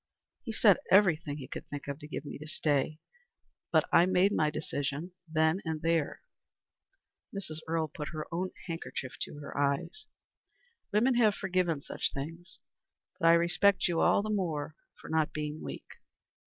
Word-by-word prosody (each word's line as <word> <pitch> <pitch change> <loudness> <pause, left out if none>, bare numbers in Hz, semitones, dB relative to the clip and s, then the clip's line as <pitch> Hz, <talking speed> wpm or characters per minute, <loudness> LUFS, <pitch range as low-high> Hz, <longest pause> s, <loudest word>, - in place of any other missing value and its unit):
He 230 - -5
said 215 -3 +5
everything 165 -7 +4
he 135 -3 -7
could - - -7
think 145 -1 -7
of 140 +1 -4
to 150 - -9
get 150 - -5
me 145 - -7
to 155 - -8
stay, 150 0 0 0.7
but - - +4
I 175 - +7
made 185 +2 +4
my 155 -6 +2
decision 150 +3 -3 0.2
then 160 +3 +2
and 160 -2 -3
there." 165 -3 0 1.1
Mrs. 175 -6 -5
Earle 160 -1 0
put 150 0 -6
her 155 -2 -5
own 185 +2 -1 0.2
handkerchief 165 -6 -5
to - - -4
her 145 - -8
eyes. 140 - -1 0.8
"Women 235 +6 +4
have 215 -4 +4
forgiven 180 -6 0
such - - -2
things; 165 +6 -7 0.6
but 165 - +3
I 165 - +8
respect 175 +4 +4
you 170 -2 0
all 200 - +4
the 215 - -2
more 160 -7 -1 0.2
for - - -11
not 160 -1 +1
being 150 0 -4
weak. - - -6
160 Hz, 165 wpm, -31 LUFS, 150-185 Hz, 1.1 s, I